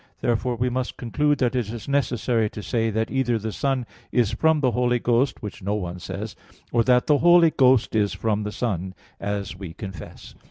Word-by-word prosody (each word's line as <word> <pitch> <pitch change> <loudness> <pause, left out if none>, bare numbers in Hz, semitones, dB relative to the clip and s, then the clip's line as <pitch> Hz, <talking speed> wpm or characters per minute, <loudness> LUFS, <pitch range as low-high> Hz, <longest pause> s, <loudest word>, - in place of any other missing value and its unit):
Therefore 120 +1 0
we 125 +2 0
must 130 0 -3
conclude 145 +5 +1
that 125 -1 0
it 120 -5 -1
is 115 -2 -7
necessary 120 -5 +1
to 105 - -8
say 115 0 0
that 110 +1 -1
either 130 -3 +1
the 110 0 -4
Son 135 +1 -1 0.3
is 120 -5 +2
from 160 -1 +2
the 130 -4 +2
Holy 125 +1 +1
Ghost; 120 +2 +1
which 105 - -7
no 100 +2 -1
one 90 -3 -4
says; - - -6 0.4
or 120 -1 +3
that 125 -1 +4
the 145 -2 +3
Holy 175 -1 +6
Ghost 130 -5 +3
is 105 -2 +2
from 105 +1 -1
the 105 0 -4
Son, 95 -4 -3 0.2
as 100 -1 -3
we 95 -3 -8
confess. 95 -7 -9
120 Hz, 200 wpm, -24 LUFS, 105-130 Hz, 0.4 s, Holy